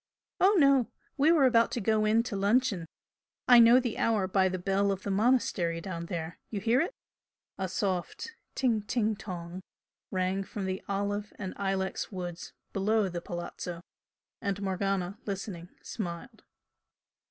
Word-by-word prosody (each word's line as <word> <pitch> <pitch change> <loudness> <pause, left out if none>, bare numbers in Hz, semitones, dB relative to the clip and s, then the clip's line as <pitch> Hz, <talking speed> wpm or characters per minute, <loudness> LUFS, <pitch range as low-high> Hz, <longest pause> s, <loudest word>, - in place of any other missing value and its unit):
"Oh 395 +3 +5
no! 275 -6 +5 0.3
We 295 +3 +4
were 310 -5 +5
about 230 -2 +4
to - - -1
go 215 0 +2
in 220 +2 +3
to 235 - -4
luncheon 200 -3 +1 0.6
I 245 -1 +9
know 235 +2 +8
the 240 -3 -3
hour 215 -4 +2
by 190 0 +3
the 185 - -2
bell 195 +2 +1
of 195 -1 -4
the 200 - -2
monastery 195 -6 +2
down 170 -1 -5
there 170 -2 -5
you 210 - -3
hear 230 +5 +3
it?" 350 +9 -3 0.6
A 190 - -1
soft 190 - -2 0.2
"ting 235 -5 +1
ting 215 +1 0
tong" 180 -2 -7 0.5
rang 185 +1 0
from 195 0 -5
the 190 0 -3
olive 205 +1 -2
and 190 -2 -5
ilex 195 0 -2
woods 175 -3 -6 0.2
below 205 +1 +2
the 175 -1 -5
Palazzo, 175 0 -6 0.6
and 200 -2 -2
Morgana, 195 0 -1
listening, 190 -3 -5
smiled. 205 +2 -6
200 Hz, 155 wpm, -29 LUFS, 185-225 Hz, 0.6 s, I